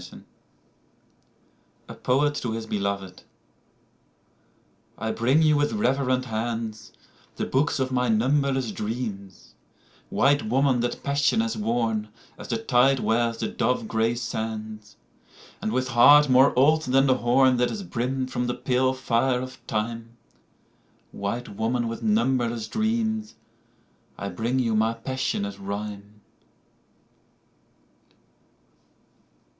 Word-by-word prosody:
8 - - -12 1.7
A - - -8
POET 145 +3 +1
TO 120 -5 -3
HIS 115 0 -4
BELOVED 100 -3 -3 1.8
I 110 +1 -2
BRING 130 +9 +2
you 155 -1 +4
with 145 0 +1
reverent 130 -9 +1
hands 110 -1 -4 0.4
The - - -2
books 140 +2 0
of 130 0 -1
my 125 -1 +1
numberless 130 +2 +1
dreams; 105 -4 -6 0.6
White 145 -2 +2
woman 130 +2 +2
that 120 0 -3
passion 140 -3 +1
has 115 +1 -2
worn 110 -1 -1 0.3
As - - -10
the 115 - -1
tide 125 +4 +3
wears 115 0 0
the - - -2
dove 125 -3 -1
gray 115 +1 0
sands, 110 -2 -5 0.7
And 110 - -2
with 130 +2 -1
heart 145 +4 +7
more 130 0 +4
old 155 +4 +4
than 135 -1 +2
the 130 -1 +3
horn 125 +1 +3
That 125 0 +2
is 210 - -5
brimmed 130 -3 -3
from 125 0 -2
the 125 - -2
pale 130 0 +1
fire 125 0 +1
of 130 0 -7
time: 115 +2 -4 0.9
White 100 +5 -4
woman 115 +3 -1
with 115 +1 -5
numberless 115 +1 0
dreams 220 - -1 0.8
I 100 - -4
bring 115 +8 -2
you 115 -4 +1
my 110 +1 +1
passionate 115 -5 -3
rhyme. 100 +1 -5
120 Hz, 120 wpm, -25 LUFS, 110-130 Hz, 1.8 s, heart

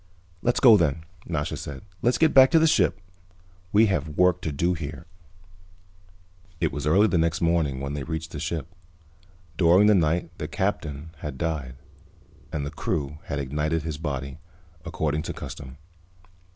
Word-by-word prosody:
"Let's 120 - +1
go, 115 -5 +8
then," 80 -3 0 0.2
Nasha 75 -4 -2
said. 70 -2 -7 0.2
"Let's 120 +1 +2
get 160 -2 +3
back 130 -1 +8
to - - +4
the 160 - +5
ship. 155 - +2 0.7
We 110 +2 +5
have 75 -7 -2
work 90 -1 +3
to 80 - -3
do 85 +5 0
here." 80 -1 -6 1.5
It 80 -2 +1
was 70 +2 -4
early 95 +7 +5
the 90 -6 +2
next 80 0 +1
morning 85 -6 +1
when 70 +1 -4
they 75 - -3
reached 80 +2 -5
the 80 - -6
ship. 80 -1 -3 0.9
During 90 +3 +5
the 105 - +6
night 85 -1 +1
the 75 - -3
Captain 80 -5 -3
had 75 -3 -6
died, 75 -6 -3 0.8
and 70 -2 -3
the 70 - -5
crew 75 -1 -3
had 70 - -3
ignited 75 +4 -1
his 80 -2 -5
body, 70 -2 -4 0.4
according 80 -3 -2
to - - -5
custom. 65 +1 -9
80 Hz, 165 wpm, -25 LUFS, 75-90 Hz, 1.5 s, go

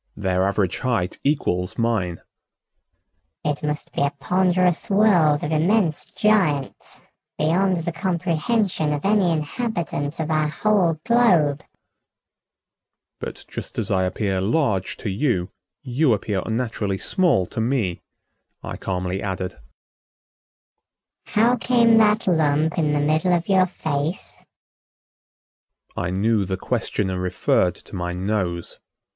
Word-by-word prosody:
"Their 95 -1 +1
average 100 -3 0
height 115 -8 -1
equals 90 -11 0
mine." 110 -7 -1 1.2
"It 150 -1 -1
must 150 0 -4
be - - -2
a 140 - +3
ponderous 180 +5 +1
world 180 -8 +4
of 150 - -2
immense 165 +1 +1
giants 180 -11 0 0.4
beyond 175 +2 +1
the 170 - -2
comprehension 175 -1 0
of 145 +3 -4
any 200 -3 +3
inhabitant 160 - -3
of 160 0 -2
our 155 -1 +2
whole 175 +2 +2
globe." 175 -12 +3 1.6
"But - - -7
just - - -8
as - - -2
I 95 -1 +2
appear 95 0 -1
large 105 - 0
to 110 - -4
you, 95 -5 -1 0.3
you 130 +1 +2
appear 100 -2 -2
unnaturally 110 -4 -2
small 170 - +2
to 110 - -4
me," 110 -7 -1 0.6
I - - -6
calmly 90 0 -3
added. 95 -2 -4 1.7
"How 235 +4 +2
came 235 -1 +4
that 215 0 +3
lump 160 -2 +2
in 150 -2 +1
the 145 - +1
middle 155 +5 +2
of 170 0 -2
your 190 -2 +4
face?" 155 -1 -4 1.5
I 85 - -2
knew 105 +3 +1
the 95 0 -3
questioner 95 -1 -2
referred 90 0 +1
to - - -11
my 90 -1 -3
nose. 90 -2 -3
150 Hz, 120 wpm, -22 LUFS, -, 1.7 s, world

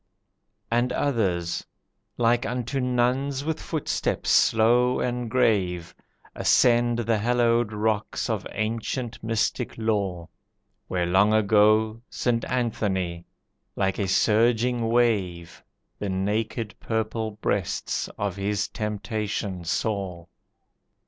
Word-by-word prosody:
And 120 +2 +2
others 95 -11 0 0.5
like 120 0 +3
unto 125 +2 -2
nuns 130 +2 0
with 160 0 -2
footsteps 160 -3 -1
slow 120 +3 +4
and 125 -1 -2
grave, 95 -8 +1 0.4
Ascend 120 -1 +3
the 115 -2 +1
hallowed 120 0 +2
rocks 105 0 -1
of - - -2
ancient 115 +2 -3
mystic 115 +2 -1
lore, 100 -6 -1 0.6
Where 90 -1 -1
long 100 +5 +4
ago 110 +1 +3
St. 115 -2 0
Anthony, 95 -8 -2 0.5
like 95 -1 0
a 100 - 0
surging 115 +4 +2
wave, 95 -8 0 0.4
The 100 - -3
naked 105 +3 -2
purpled 110 -1 -3
breasts 100 -3 -1
of 100 -2 -2
his 100 +1 -1
temptation 105 -3 -3
saw. 95 -2 -2
110 Hz, 100 wpm, -25 LUFS, 100-120 Hz, 0.6 s, slow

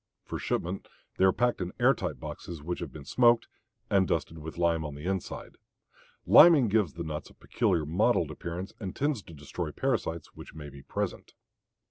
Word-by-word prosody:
For - - -5
shipment 90 +3 -2 0.3
they 95 - +4
are 95 - +6
packed 120 0 0
in 90 0 -3
air - - +6
tight - - -4
boxes 85 -4 -7
which 90 +3 -3
have 85 -6 -5
been 70 0 -10
smoked 120 - +4 0.4
and 95 -2 +3
dusted 80 0 -2
with 80 +2 -8
lime 85 -2 +2
on 75 -2 -5
the 75 +3 -9
inside. 95 -1 -4 0.7
Liming 150 -10 +8
gives 100 -7 +2
the 85 - -5
nuts 75 -1 -5
a - - -19
peculiar 85 -4 0
mottled 80 +4 +2
appearance 90 +3 -6
and 95 -4 -5
tends 145 -5 0
to 85 - -14
destroy 75 -1 -5
parasites 80 -1 -2
which - - -12
may 75 -2 -8
be 70 0 -12
present. - - -4
85 Hz, 185 wpm, -29 LUFS, 80-95 Hz, 0.7 s, Liming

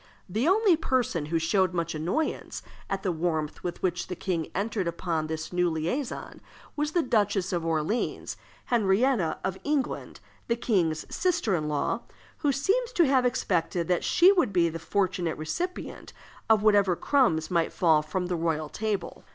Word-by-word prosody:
The 220 - 0
only 390 0 +5
person 250 - 0
who 165 +2 0
showed 180 +2 +1
much 170 -1 -1
annoyance 175 - -2 0.3
at 195 0 -2
the 185 - +1
warmth 160 -2 -2
with 175 -1 -5
which 180 -1 -1
the 180 - -4
king 170 -3 -2
entered 200 -1 -1
upon 165 -2 -2
this 160 +2 -5
new 180 0 +2
liaison 170 - -3 0.3
was 295 +1 -1
the 345 - +2
Duchess 205 -6 +1
of 170 -2 -1
Orleans, 165 +7 -1 0.3
Henrietta 220 -3 +2
of 190 0 -3
England, 290 -2 -2 0.3
the 235 - +1
king's 175 -10 0
sister 335 - +1
in 155 -4 0
law, 150 -1 -1 0.4
who 290 - +2
seems 415 - 0
to 345 - +4
have 260 -2 +3
expected 175 -6 -1
that 180 - +1
she 365 +2 +6
would 350 - +2
be 175 -3 +3
the 165 +1 -6
fortunate 180 -2 -1
recipient 350 - -5 0.4
of 220 -2 +4
whatever 205 -4 +4
crumbs 175 - +2
might 170 -2 +1
fall 160 -3 +3
from 180 +4 -3
the 180 0 -1
royal 160 -2 -1
table. 215 +1 -3
185 Hz, 165 wpm, -27 LUFS, 165-245 Hz, 0.4 s, she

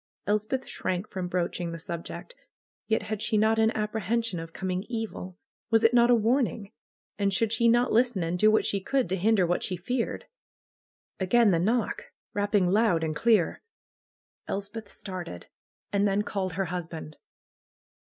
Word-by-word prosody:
Elspeth 215 +5 -1
shrank 185 +2 -2
from 185 -2 -3
broaching 175 -1 -2
the 165 - -5
subject. 170 - -6 0.5
Yet 220 -1 +1
had 215 0 -4
she 220 -1 +1
not 220 +1 +3
an 220 0 +4
apprehension 220 -1 -1
of 165 0 -7
coming 185 +1 -3
evil? 220 -6 -5 0.3
Was 225 0 +3
it 225 - +5
not 240 0 +5
a 245 - +7
warn 235 +3 +3
ing? 200 -4 -9 0.5
And 200 -1 +2
should 220 +3 +1
she 235 +1 +3
not 240 +2 +3
listen 235 -5 +2
and 170 +2 -2
do 215 - +6
what 215 - +3
she 200 - 0
could 265 +4 0
to 190 - +1
hinder 195 0 +3
what 175 +1 0
she 185 - -2
feared? 235 +7 -2 0.9
Again 205 +3 +4
the 170 - +2
knock! 220 +5 0 0.3
Eapping 205 -3 +2
loud 205 -6 +3
and 155 -1 -1
clear. 220 -2 +2 0.9
Elspeth 205 +2 -4
started. 180 - -7 0.5
And 200 0 +3
then 200 +1 +1
called 190 -3 -3
her 190 +3 -1
husband. 165 -3 -6
205 Hz, 165 wpm, -27 LUFS, 180-225 Hz, 0.9 s, a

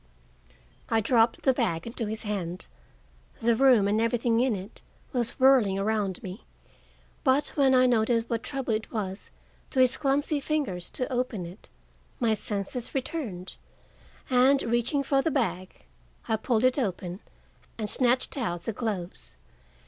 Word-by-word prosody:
I 225 - +3
dropped 225 +1 +2
the 265 - +4
bag 195 -10 -1
into 230 -1 -4
his 220 +1 -4
hand. 185 -4 -3 0.7
The 230 0 +2
room 245 -5 +5
and 210 +2 +2
everything 230 0 +1
in 250 -2 +2
it 195 +3 -9 0.3
was 240 -1 -2
whirling 255 -7 +5
around 200 -2 -1
me. 190 +4 -7 0.8
But 275 0 +3
when 270 -3 +3
I 255 0 +5
noted 230 -1 +2
what 230 -1 -2
trouble 270 -4 -3
it 215 +1 -3
was 195 -3 -4 0.4
to 265 - -1
his 255 -1 +4
clumsy 285 +1 +1
fingers 275 - -2
to 255 0 -3
open 245 -7 -2
it, 175 +4 -12 0.5
my 230 -4 +2
senses 215 +4 -4
returned 245 - -4 0.7
and, 260 +2 +4
reaching 240 +5 0
for 275 0 +2
the 325 - 0
bag, 185 - -2 0.4
I 220 - +2
pulled 220 +1 0
it 255 +2 +3
open 185 -5 -3 0.6
and 215 -2 -3
snatched 250 +3 +1
out 175 -8 -2
the 225 - -3
gloves. 195 - -5
230 Hz, 150 wpm, -27 LUFS, 205-255 Hz, 0.8 s, room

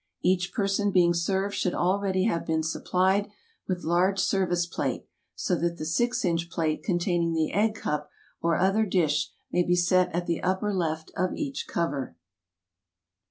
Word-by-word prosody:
Each 180 0 +2
person 200 0 +1
being 175 -3 +4
served 190 +3 0
should 180 - -1
already 190 +1 +1
have 170 -6 0
been 160 -1 0
supplied 190 +5 +1 0.4
with 180 -2 -2
large 180 +4 +2
service 180 -3 +1
plate, 170 - -3 0.3
so 180 - 0
that 170 0 -1
the 155 - -5
six 240 +9 0
inch 170 -1 0
plate 160 -3 -1
containing 175 -2 0
the 160 -1 0
egg 215 +2 +2
cup 150 -7 -3 0.3
or 165 0 +2
other 195 +4 +2
dish 160 -6 +1 0.2
may 180 - +2
be 175 0 +2
set 180 +1 +3
at 175 0 -1
the 170 -1 -1
upper 190 +3 0
left 160 -4 -2
of 185 +1 0
each 280 -3 -4
cover. 140 - -2
180 Hz, 160 wpm, -27 LUFS, 170-195 Hz, 0.4 s, being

